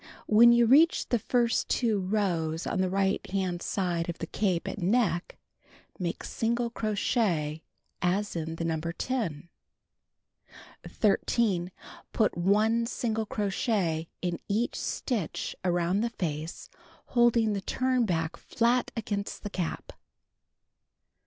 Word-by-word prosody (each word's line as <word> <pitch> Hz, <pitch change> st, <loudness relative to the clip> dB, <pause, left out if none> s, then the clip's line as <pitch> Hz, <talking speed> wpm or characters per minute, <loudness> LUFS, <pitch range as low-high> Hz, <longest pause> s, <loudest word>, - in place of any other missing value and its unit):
When 235 Hz, +3 st, +7 dB
you 235 Hz, 0 st, +5 dB
reach 295 Hz, +8 st, +5 dB
the 240 Hz, -, +2 dB
first 240 Hz, +2 st, +1 dB
2 225 Hz, -5 st, +1 dB
rows 180 Hz, -5 st, -1 dB
on 185 Hz, -, 0 dB
the 185 Hz, -, +1 dB
right 195 Hz, +1 st, +1 dB
hand 185 Hz, -2 st, -1 dB
side 175 Hz, -3 st, -1 dB
of 170 Hz, -, -4 dB
the -, -, -4 dB
cape 185 Hz, -1 st, -1 dB
at -, -, -4 dB
neck, 180 Hz, -3 st, +1 dB, 0.6 s
make 175 Hz, -2 st, -3 dB
single 235 Hz, +1 st, -1 dB
crochet 200 Hz, -, 0 dB, 0.4 s
as 190 Hz, +3 st, 0 dB
in 160 Hz, 0 st, -3 dB
the 165 Hz, -, -3 dB
No. 160 Hz, -1 st, -1 dB
10. 170 Hz, -, -3 dB, 1.4 s
13. 195 Hz, -3 st, +1 dB, 0.4 s
Put 215 Hz, -, +2 dB
1 215 Hz, +6 st, +2 dB
single 225 Hz, -3 st, -2 dB
crochet 195 Hz, -6 st, -1 dB, 0.2 s
in 175 Hz, -1 st, -1 dB
each 220 Hz, +4 st, 0 dB
stitch 220 Hz, -, -3 dB
arouml 175 Hz, +2 st, +1 dB
the 235 Hz, -, 0 dB
face 160 Hz, -6 st, -5 dB, 0.4 s
holding 235 Hz, -3 st, +3 dB
the 200 Hz, -, -2 dB
turn 255 Hz, +3 st, +1 dB
back 165 Hz, -2 st, -1 dB
flat 240 Hz, +2 st, +1 dB
against 205 Hz, -2 st, -3 dB
the 205 Hz, -, -5 dB
cap. 175 Hz, -4 st, -4 dB
200 Hz, 125 wpm, -28 LUFS, 170-230 Hz, 1.4 s, When